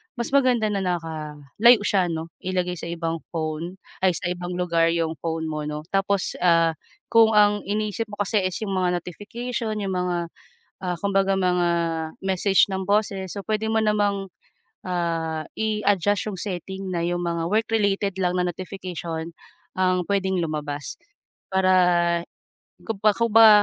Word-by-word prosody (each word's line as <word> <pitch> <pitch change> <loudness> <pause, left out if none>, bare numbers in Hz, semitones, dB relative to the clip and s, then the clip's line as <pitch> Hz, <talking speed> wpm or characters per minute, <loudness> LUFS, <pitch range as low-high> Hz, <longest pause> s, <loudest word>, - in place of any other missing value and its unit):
mas 235 0 -3
maganda 250 -6 +3
na 200 - 0
naka-layo 165 - +2
siya 190 -4 +2
'no 165 0 -4
ilagay 180 -1 -2
sa - - -6
ibang 165 -1 -3 0.2
phone, 160 +3 -3 0.2
ay 185 -2 +3
sa 175 - -2
ibang 180 0 -4
lugar 170 -2 +2
'yong 160 -3 -1
phone 160 0 -2
mo 155 -1 -3
'no 150 0 -4
tapos, 195 0 0
ah, 165 -2 +4 0.4
kung 225 -1 +6
ang 205 0 +5
iniisip 215 +1 -1
mo 210 - -9
kasi 210 +2 +1
is 185 - -5
'yong 200 - -3
mga 180 -2 0
notification, 225 +4 -4
'yong 200 -2 -2
mga 180 -1 0 0.7
ah, 180 -1 -1
kumbaga 195 -1 +2
mga 180 -2 +2 0.5
message 190 +1 +3
ng 190 -1 -3
bosses, 200 -2 0
so 200 - -5
puwede 220 +2 -1
mo 220 - +3
namang, 205 -2 +1 0.6
ah, 165 -3 -2
i-adjust 205 -2 +1
yung 205 - -3
setting 190 0 -5
na 170 -2 -1
yung 175 0 -1
mga 170 -1 -1
work-related 205 -2 +1
lang 180 -1 +1
na 180 -1 +1
notification 175 -3 -6 0.5
ang 185 -1 +2
puwedeng 190 -2 +1
lumabas. 150 - -4 0.5
Para 190 0 +3 1.1
kumba 215 -1 +2
kumba 225 -1 +6
185 Hz, 145 wpm, -24 LUFS, 170-205 Hz, 1.1 s, kung